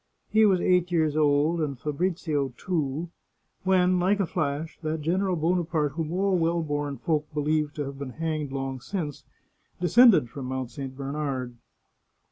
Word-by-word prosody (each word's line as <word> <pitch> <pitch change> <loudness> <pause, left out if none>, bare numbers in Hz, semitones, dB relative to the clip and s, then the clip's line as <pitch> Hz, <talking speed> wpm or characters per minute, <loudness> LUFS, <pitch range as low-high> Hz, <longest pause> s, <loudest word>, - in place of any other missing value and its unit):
He 220 0 +5
was 190 -3 +3
eight 180 0 +2
years 160 -3 +2
old, 155 +2 +3
and 140 -4 -2
Fabrizio 150 -3 -1
two, 160 -2 -2 0.5
when, 185 -1 +3
like 195 +3 +2
a 195 - +2
flash, 155 -2 -3
that 155 -1 -2
General 185 +4 +1
Bonaparte 165 -2 0
whom 160 +1 -3
all 195 +1 +2
well 165 0 +1
born 145 -2 -2
folk 150 +3 -1
believed 150 0 0
to 150 - -2
have 135 0 -7
been 135 -3 -6
hanged 155 -3 -3
long 135 -1 -3
since, 155 -4 -5 0.5
descended 205 - +6
from 130 +2 -7
Mount 130 -1 -3
St. 130 +1 -7
Bernard. 135 -3 -3
155 Hz, 155 wpm, -26 LUFS, 140-175 Hz, 0.5 s, descended